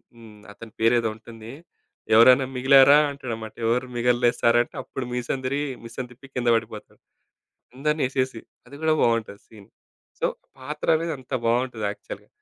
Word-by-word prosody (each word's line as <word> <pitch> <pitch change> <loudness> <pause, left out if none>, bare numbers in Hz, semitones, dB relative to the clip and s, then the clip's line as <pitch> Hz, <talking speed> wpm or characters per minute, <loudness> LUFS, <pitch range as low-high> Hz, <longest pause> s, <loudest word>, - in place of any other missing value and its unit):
హ్మ్. 110 -3 -15
అతని 110 +1 -12
పేరేదో 115 0 +2
ఉంటుంది. 115 0 -12 0.6
"ఎవరైనా 125 +4 +7
మిగిలారా" 135 +2 +6
అంటాడనమాట. 115 -6 -7
"ఎవరు 125 +3 0
మిగల్లే 120 0 +2
సారంటే" 120 0 +2
అప్పుడు 130 - -6
మీసం 125 +2 -2
దిరిగి, 140 +2 -1
మీసం 120 +3 -7
తిప్పి 135 +3 -15
కింద 120 -1 -2
పడిపోతాడు. 110 -1 -6 0.8
అందరిని 150 +2 -1
ఏసేసి. 130 -3 -2 0.3
అది 140 +3 -12
గూడా 160 0 +3
బావుంటది 115 -3 0
సీన్. 105 -3 -16 0.5
సో - - +1 0.3
పాత్రనేది 155 +4 -1
అంత 130 - -15
బావుంటది 120 -2 0
యాక్చువల్‌గా. 105 - -10
120 Hz, 135 wpm, -24 LUFS, 115-130 Hz, 0.8 s, ఎవరైనా